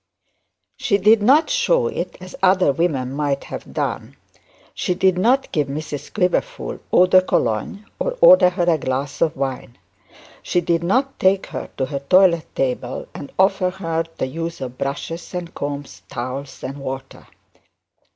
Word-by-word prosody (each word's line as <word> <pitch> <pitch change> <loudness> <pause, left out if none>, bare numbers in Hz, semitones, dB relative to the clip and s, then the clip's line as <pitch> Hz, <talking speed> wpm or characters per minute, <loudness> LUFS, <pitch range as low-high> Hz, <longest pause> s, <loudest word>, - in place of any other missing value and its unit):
She 200 - +1
did 210 +2 +5
not 275 +9 +5
show - - +2
it 470 - -4
as 185 0 -10
other 185 -4 +4
women 135 -5 -1
might 140 -1 -1
have - - -8
done. - - -3 0.6
She 180 - -1
did 190 0 +3
not 250 +9 +2
give 150 -3 0
Mrs 145 0 -6
Quiverful 215 - -1
eau 180 - +6
de 185 0 +6
Cologne, 155 - -1
or - - -2
order 275 - +8
her 180 0 -2
a 165 -3 +3
glass 135 +1 -3
of 160 -4 +1
wine. 130 -3 -4 0.6
She 175 - 0
did 170 -1 0
not 260 +10 0
take 190 +1 +3
her - - -5
to 130 - 0
her 140 0 -4
toilet 170 +3 +4
table, 125 -1 -2
and 140 - -8
offer 190 -1 +3
her 165 -3 -2
the - - -1
use 165 +5 -5
of 130 -1 -7
brushes 165 +6 -4
and 175 -1 -5
combs, 145 0 -5
towels 130 +3 -6
and 135 +2 -5
water. 135 -1 -7
170 Hz, 160 wpm, -21 LUFS, 140-190 Hz, 0.6 s, order